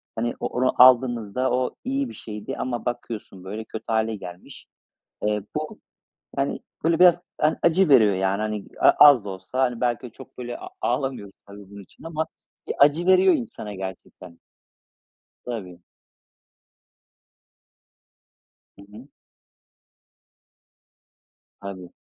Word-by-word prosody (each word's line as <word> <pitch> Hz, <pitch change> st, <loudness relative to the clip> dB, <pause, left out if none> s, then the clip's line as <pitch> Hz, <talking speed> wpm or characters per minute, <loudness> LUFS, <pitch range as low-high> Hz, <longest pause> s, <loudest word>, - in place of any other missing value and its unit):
hani, 120 Hz, +1 st, -1 dB
o -, -, -2 dB
onu 130 Hz, +1 st, 0 dB
aldığınızda 125 Hz, -1 st, +3 dB
o 125 Hz, 0 st, -1 dB
iyi 270 Hz, 0 st, -2 dB
bir -, -, -10 dB
şeydi 105 Hz, -1 st, -7 dB
ama 120 Hz, -2 st, -3 dB
bakıyorsun, 110 Hz, -6 st, -5 dB
böyle, 105 Hz, +4 st, -6 dB
kötü 110 Hz, -, -8 dB
hâle 110 Hz, 0 st, 0 dB
gelmiş. 90 Hz, -2 st, -11 dB, 0.6 s
Eee, 105 Hz, -1 st, 0 dB
bu, 155 Hz, 0 st, -4 dB, 0.6 s
hani, 140 Hz, 0 st, -1 dB, 0.2 s
böyle 165 Hz, +1 st, +2 dB
biraz, 180 Hz, -1 st, +7 dB, 0.2 s
yani, 155 Hz, +1 st, +2 dB
acı 170 Hz, +1 st, +3 dB
veriyor, 110 Hz, -8 st, +6 dB
yani, 95 Hz, +2 st, 0 dB
hani, 105 Hz, -1 st, -3 dB
a -, -, +6 dB, 0.2 s
az 125 Hz, -8 st, +3 dB
da 100 Hz, -, -5 dB
olsa 120 Hz, +6 st, -2 dB
belki 120 Hz, 0 st, -1 dB
ö -, -, -11 dB
çok, -, -, -15 dB
böyle, 120 Hz, -1 st, -6 dB
a -, -, -9 dB
ağlamıyorum 125 Hz, -6 st, -2 dB
tabii 100 Hz, -1 st, -13 dB
bunun 100 Hz, 0 st, -10 dB
için -, -, -20 dB
ama 160 Hz, -1 st, -3 dB, 0.4 s
bir -, -, -3 dB
acı 150 Hz, +5 st, +4 dB
veriyor 185 Hz, -, +5 dB
insana 235 Hz, -, -5 dB
gerçekten. 95 Hz, -2 st, -9 dB, 1.1 s
Tabii. 90 Hz, -8 st, -7 dB, 3.0 s
Hı -, -, -12 dB
hı. 120 Hz, +7 st, -12 dB, 2.5 s
Tabii. 95 Hz, -3 st, -8 dB
120 Hz, 130 wpm, -24 LUFS, 100-140 Hz, 3.0 s, biraz